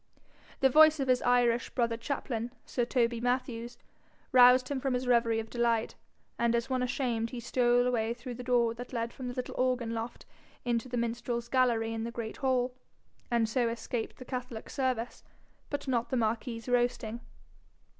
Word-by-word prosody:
The 265 - +6
voice 310 +1 +7
of 270 - -1
his 255 -1 +3
Irish 245 -1 +2
brother 235 -2 0
chaplain, 235 -1 -3
Sir 245 - -1
Toby 235 -2 +1
Mathews, 245 -1 -2 0.5
roused 255 0 +7
him 280 -2 -1
from 265 -1 0
his 250 +1 -2
reverie 235 -2 +3
of 220 0 -6
delight, 235 -2 +1 0.5
and 235 0 +2
as 235 +3 -1
one 255 -1 +1
ashamed 250 -3 -1
he 245 - -6
stole 245 +1 +2
away 235 -2 0
through 245 +1 -7
the 250 +1 -7
door 240 -2 +2
that 245 +2 -9
led 230 -1 -2
from 260 -2 -6
the 245 - -5
little 255 - -4
organ 250 -3 +1
loft 230 +1 -5 0.4
into 240 +1 -1
the 245 - -2
minstrel's 235 0 -2
gallery 235 -3 +2
in 225 0 -3
the 230 - -3
great 235 -2 -6
hall, 255 -2 +1 0.6
and 235 -2 +2
so 235 +1 +1
escaped 230 0 -4
the 255 - -10
catholic 250 -3 -6
service, 255 -3 -2 0.5
but 285 -1 -4
not 240 -3 0
the 260 - 0
marquis's 230 +1 -2
roasting. 240 -2 0
240 Hz, 175 wpm, -30 LUFS, 230-255 Hz, 0.6 s, voice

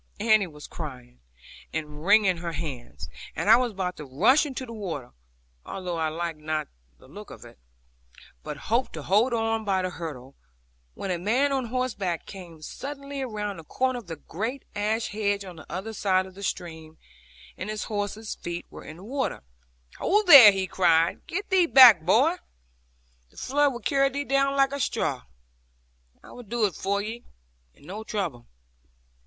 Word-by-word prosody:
Annie 215 -2 +4
was 150 -3 -12
crying, 125 - -9 0.5
and 150 -1 -5
wringing 200 -1 +4
her 170 0 -5
hands, 130 - -6 0.3
and - - +2
I - - +10
was 245 -1 0
about 185 -3 -3
to 150 - -8
rush 255 - +3
into 265 -2 -5
the 230 - -9
water, 170 - -6 0.5
although 180 -3 -5
I 160 -1 0
liked 165 0 -4
not 155 -1 -3 0.3
the - - -19
look - - -11
of - - -11
it, - - -15 0.8
but - - -6 0.2
hoped 245 +2 +1
to 155 - -6
hold 215 - +3
on 225 -1 0
by 190 -3 0
the 185 - -2
hurdle, 140 -7 -7 0.6
when 195 - -4
a 175 - -1
man 245 +10 +1
on 265 -2 0
horseback 230 -8 -2
came 170 -5 -11
suddenly 280 - -6
round 210 -6 -4
the - - -10
corner 255 +9 -1
of 225 - -15
the 165 - -5
great 220 - -5
ash 215 +2 -1
hedge 205 -1 -1
on 180 -3 -10
the 155 - -13
other 190 +6 -5
side 190 -3 +1
of 190 - -12
the 195 - -12
stream, 160 -4 -5 0.6
and 185 - -6
his 215 -1 -3
horse's 210 +1 -4
feet 175 0 -6
were - - -10
in 155 - -10
the 180 - -13
water. 265 - -3 0.6
'Ho, 415 +3 +2
there,' 275 - +11
he 195 -1 -1
cried; 170 -2 +2
'get 400 +3 -4
thee 365 -2 +4
back, 245 - +9
boy. 250 - +3 0.9
The - - -25
flood 285 +2 +2
will 240 -1 -7
carry 275 -1 +2
thee 280 +2 -3
down 275 0 +2
like 275 0 +4
a 280 - -4
straw. 65 - -1 1.0
I - - -14
will 245 - -10
do 230 0 0
it 195 - -1
for 200 +4 -1
thee, 230 +3 -6 0.5
and - - -20
no 205 +6 -7
trouble.' 175 - -4
200 Hz, 180 wpm, -26 LUFS, 165-245 Hz, 1.0 s, there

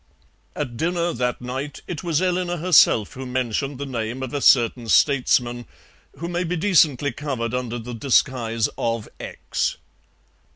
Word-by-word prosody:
At 125 -6 -4
dinner 170 +3 0
that 125 0 -2
night 130 +4 -5
it 165 -1 -6
was 170 0 0
Eleanor 180 -1 0
herself 155 - +4
who 130 0 -7
mentioned 130 +2 -2
the 140 - -4
name 120 0 -4
of 130 - -6
a 145 - -2
certain 120 -2 +4
statesman, 120 -4 +2 0.5
who 170 - -5
may 175 +1 -1
be 175 +1 -2
decently 155 -7 +3
covered 125 -4 -4
under 125 -1 -2
the 120 +1 -7
disguise 115 -2 +1
of 115 -2 -1
X. - - -3
130 Hz, 150 wpm, -22 LUFS, 120-160 Hz, 0.5 s, herself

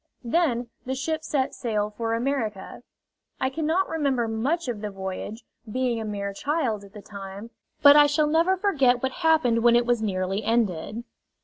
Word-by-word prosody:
Then 245 -3 0
the 260 +1 -3
ship 315 +4 -2
set 280 -3 -1
sail 210 -4 -2
for 230 -1 -1
America. 230 -6 -3 0.6
I 260 - 0
cannot 320 +5 0
remember 275 -7 0
much 260 +9 -1
of 230 -4 -4
the 210 - -3
voyage, 195 +3 -6 0.3
being 245 -1 0
a - - -4
mere 200 -1 -4
child 255 -4 -1
at 200 0 -15
the 210 - -10
time, 200 +2 -9 0.3
but 285 0 +9
I 295 0 +7
shall 295 +1 +2
never 330 +5 +2
forget 275 -11 +2
what 265 - 0
happened 315 -8 +2
when 235 0 +5
it 240 0 +3
was 240 -2 +1
nearly 195 0 -1
ended. 225 -1 -1
240 Hz, 175 wpm, -25 LUFS, 215-290 Hz, 0.6 s, but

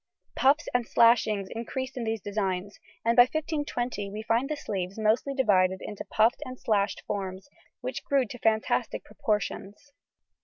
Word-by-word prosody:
Puffs 285 +5 +3
and 245 -2 +1
slashings 220 -4 +4
increased 260 +3 -4
in 245 -3 -3
these 220 -1 -2
designs, 200 -1 -3 0.3
and 230 0 +3
by 245 - +9
1520 290 -9 -2
we 210 +2 -6
find 235 +5 +1
the 305 - -1
sleeves 195 -7 -4
mostly 220 +6 +1
divided 190 -7 +3
into 210 -1 -6
puffed 220 +4 +2
and 255 0 -8
slashed 205 -2 0
forms, 190 +1 -4 0.3
which - - -4
grew 275 -2 +2
to 245 +2 -9
fantastic 220 -1 0
proportions. 210 +4 -3
220 Hz, 150 wpm, -28 LUFS, 200-250 Hz, 0.3 s, by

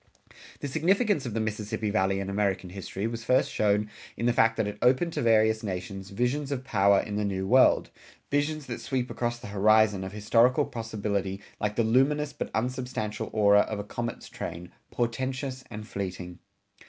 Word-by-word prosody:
The - - -2
significance 170 - +1
of 115 - -5
the - - 0
Mississippi 105 0 -2
Valley 95 -1 +1
in 100 - -4
American 100 -2 -1
history 95 +1 -5
was 115 0 -4
first 130 +3 +2
shown 105 0 +1 0.3
in 120 - -2
the 120 - +3
fact 115 -1 +3
that 110 - +1
it 105 - -5
opened 130 +7 +3
to - - -2
various 110 -1 +3
nations 95 -1 -5
visions 125 +7 -1
of 130 -2 -2
power 100 -6 +4
in 105 -1 -4
the 105 - 0
New 95 -2 -2
World 130 +5 +4 0.4
visions 145 +1 0
that - - -6
sweep 130 -2 -2
across 120 -1 -2
the 110 - -9
horizon 105 -1 +4
of 95 - -5
historical 115 +7 +3
possibility 100 -4 -3 0.2
like 105 0 -1
the 115 - +2
luminous 140 +6 +2
but - - -4
unsubstantial 125 -3 -2
aurora 105 -1 +4
of 105 +1 0
a 100 - -4
comet's 115 +2 -5
train, 90 +1 -7 0.2
portentous 130 +2 -2
and 105 -1 -8
fleeting. 90 -3 -5
110 Hz, 180 wpm, -27 LUFS, 100-125 Hz, 0.4 s, power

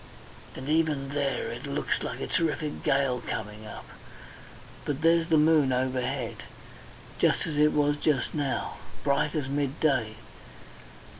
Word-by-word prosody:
And 130 - -7
even 150 -3 +1
there 140 -5 -1
it 120 +4 -6
looks 140 +1 -1
like 120 - -4
a - - -1
terrific 155 -3 -1
gale 135 -2 +1
coming 105 0 -5
up. - - -9 1.0
But 145 0 -3
there's 165 0 +4
the 160 -2 +4
moon 150 -3 +5
overhead. 130 0 -1 0.8
Just - - +3
as 155 - -3
it 150 +1 +5
was 145 0 +2
just 145 -3 +1
now. 145 -3 -2 0.3
Bright 145 +3 +1
as 145 -4 -1
midday. 140 -5 0
140 Hz, 135 wpm, -28 LUFS, 130-150 Hz, 1.0 s, moon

